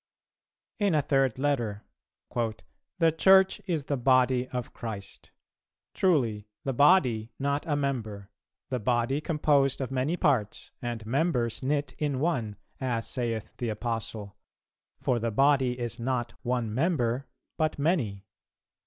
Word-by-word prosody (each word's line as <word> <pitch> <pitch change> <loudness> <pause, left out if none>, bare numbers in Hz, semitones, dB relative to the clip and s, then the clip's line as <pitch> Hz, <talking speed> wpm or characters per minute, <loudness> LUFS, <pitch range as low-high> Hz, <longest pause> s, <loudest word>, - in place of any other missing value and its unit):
In 200 -5 +2
a 150 - +2
third 135 -4 +2
letter: 120 -7 -1 0.5
"'The 120 +8 -2
Church 190 +2 +6
is 165 -5 -1
the 140 - -1
Body 130 0 +3
of 125 -2 -5
Christ.' 100 -4 -7 0.6
Truly, 120 - +1 0.2
the 135 - -1
body, 125 -6 +4
not 140 +2 -1
a 150 - +1
member; 110 -9 -3 0.4
the 125 - -1
body 120 +5 +1
composed 145 -3 +2
of 130 -1 -3
many 135 +6 0
parts 130 - 0
and 120 -2 -4
members 125 -2 0
knit 140 0 -1
in 145 -4 -1
one, 125 -10 -1 0.2
as 120 -4 -1
saith 115 -4 -3
the 120 - -2
Apostle, 110 -2 -4 0.6
'For 125 -2 +1
the 115 +1 -1
Body 130 +1 +3
is 120 -1 -4
not 120 -1 -2
one 120 -3 -1
member, 130 -3 0 0.3
but 155 -1 0
many.' 135 - 0
130 Hz, 130 wpm, -28 LUFS, 115-145 Hz, 0.6 s, Church